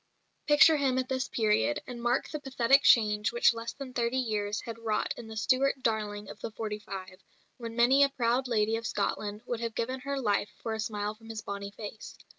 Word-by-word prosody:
Picture 305 +1 +7
him 270 -3 +1
at 255 0 -1
this 260 0 -1
period, 210 - +1
and 245 -1 -7
mark 240 +1 +1
the 305 - -5
pathetic 270 -1 +3
change 210 -4 +4
which 235 0 +4
less 230 0 -5
than 270 -2 -8
thirty 240 +1 0
years 215 -4 -1
had 230 -1 -7
wrought 220 -2 -1
in 235 - -9
the 220 0 -8
Stuart 260 +3 +1
"darling" 210 -2 -1
of - - -10
"the - - -4
forty 215 -1 -5
five," 190 -2 -8 0.4
when 230 -2 -7
many 250 +4 +5
a 280 - +6
proud 255 -1 0
lady 220 -1 +1
of 230 - -4
Scotland 205 +1 -2
would 240 -2 -3
have 230 -1 -4
given 255 +3 -2
her 275 +1 -3
life 205 -4 0
for 225 - -2
a 220 - -4
smile 210 -1 -2
from 225 +1 -16
his 220 -1 -6
bonnie 200 0 -5
face. 210 +1 -9
230 Hz, 215 wpm, -29 LUFS, 210-255 Hz, 0.4 s, Picture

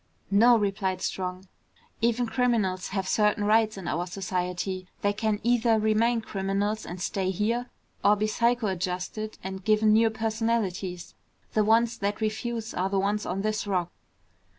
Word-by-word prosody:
"No," 235 +4 +6
replied 195 -2 -1
Strong. 185 0 -3 0.5
"Even 235 +1 +2
criminals 225 -7 0
have 190 -1 -3
certain 210 0 +2
rights 215 0 +3
in 190 - -6
our 175 +3 -1
society. 185 0 -3 0.2
They 205 0 +2
can 215 0 -1
either 235 -1 +3
remain 220 +2 +2
criminals 200 +1 -2
and 175 +2 -6
stay 190 0 -1
here, 230 +6 -1 0.3
or 205 - +6
be 210 +1 0
psychoadjusted 215 -3 -1
and 190 0 -6
given 215 +1 +4
new 225 +1 +5
personalities. 220 -5 -2 0.4
The 215 - +3
ones 230 +2 +3
that 200 +1 -1
refuse 220 +1 -3
are 185 +2 -1
the 195 - 0
ones 205 +2 0
on 195 +2 -2
this 215 -1 -1
Rock." 180 -3 -1
210 Hz, 150 wpm, -27 LUFS, 190-225 Hz, 0.5 s, No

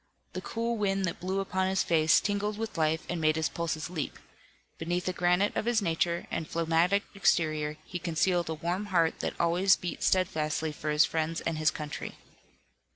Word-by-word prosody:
The - - -4
cool 230 0 -2
wind 195 -2 +1
that 170 - -4
blew 190 +2 -2
upon 190 -1 -1
his 190 0 +1
face 160 -1 +4
tingled 205 0 -1
with 225 0 -4
life 160 +1 +1
and 175 -2 -3
made 155 0 +3
his 160 -1 0
pulses 160 -2 -3
leap. 165 -5 -4 0.6
Beneath 175 +2 -2
the 185 - -1
granite 180 +3 +2
of - - -1
his 235 -1 +3
nature 170 -2 0
and 160 - -3
a - - -21
phlegmatic 170 +4 +2
exterior, 155 -6 +1
he 175 - -5
concealed 170 +1 0
a 160 - -2
warm 175 +6 -2
heart 170 -4 +2
that - - -4
always 180 +3 +4
beat 180 - -5
steadfastly 155 -4 +1
for 150 +1 -5
his 150 +1 +5
friends 160 +1 -1
and 165 -2 -2
his 155 0 +4
country. 150 -1 -6
170 Hz, 190 wpm, -29 LUFS, 160-190 Hz, 0.6 s, his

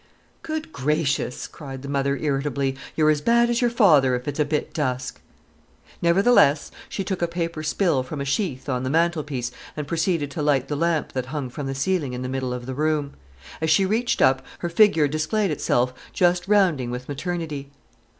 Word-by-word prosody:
"Good 315 -1 -5
gracious!" 140 -1 -1
cried 135 -3 -9
the - - -6
mother 140 0 0
irritably, 140 -2 -1 0.2
"you're 155 -1 +4
as 150 -1 0
bad 235 +6 +3
as 235 - +1
your 240 - +3
father 155 - +5
if 125 +2 -5
it's 145 +1 -3
a 150 - +3
bit 150 +1 -2
dusk!" 130 -4 -2 0.8
Nevertheless 170 -4 +4 0.2
she 195 - -3
took 190 -1 -3
a 170 - +2
paper 170 -2 -3
spill 155 -2 +1
from 140 +3 -6
a 140 - -2
sheaf 140 -2 -2
on 125 -2 -1
the 130 - -2
mantelpiece 150 -6 0 0.3
and 150 - -3
proceeded 165 -2 0
to 155 - -4
light 145 -3 +1
the 150 - -1
lamp 165 0 0
that 130 -1 -3
hung 135 -3 -4
from 140 +1 -5
the 135 - -3
ceiling 145 -2 0
in 125 +1 -4
the 125 - -3
middle 130 -1 -2
of 125 -1 -5
the 130 - -4
room. 150 0 0 0.5
As 160 - +1
she 175 +5 +4
reached 225 +5 +1
up, 130 0 +4 0.2
her 175 - -3
figure 170 -4 +4
displayed 155 +7 0
itself 125 -3 +1 0.2
just 175 0 +2
rounding 180 -12 +3
with 125 +1 -5
maternity. 150 -1 -4
150 Hz, 190 wpm, -24 LUFS, 135-170 Hz, 0.8 s, father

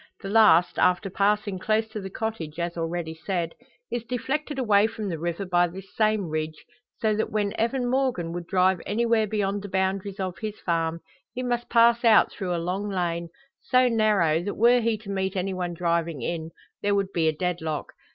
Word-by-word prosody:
The 195 - -5
last, 180 -5 +5
after 180 +1 +2
passing 205 0 +1
close 220 +3 +1
to 215 -1 -6
the 190 - -6
cottage, 185 -8 -4
as 170 0 -2
already 165 -1 -3
said, 170 0 -3 0.4
is 240 -1 -2
deflected 270 +5 -3
away 215 -5 +4
from 215 -2 -5
the 165 -3 -4
river 170 +4 -3
by 175 -1 +3
this 190 +2 -11
same 215 -2 +2
ridge, 155 0 -4 0.3
so 220 -2 +1
that 220 - -1
when 205 -1 -1
Evan 245 +2 0
Morgan 245 -10 0
would 175 -1 -5
drive 185 -1 +2
anywhere 225 0 +2
beyond 205 -1 -1
the 205 - -7
boundaries 190 +1 -1
of 185 -3 -3
his 215 +1 -5
farm, 165 -1 -1 0.3
he 255 - -3
must 240 -1 -2
pass 235 0 +5
out 225 -3 +6
through 180 -2 -3
a - - -1
long 185 +5 -2
lane, 170 -3 -2 0.3
so 255 0 +3
narrow 210 -9 +2
that 205 +3 -4
were 240 +2 +5
he 225 -1 +1
to 205 -1 -8
meet 190 0 -2
any 190 +1 -1
one 180 -2 -3
driving 170 -5 -1
in, 160 +1 -3 0.3
there 205 0 +1
would 195 -1 0
be 165 -2 +2
a - - +4
deadlock. 160 -2 -3
195 Hz, 195 wpm, -26 LUFS, 170-220 Hz, 0.4 s, out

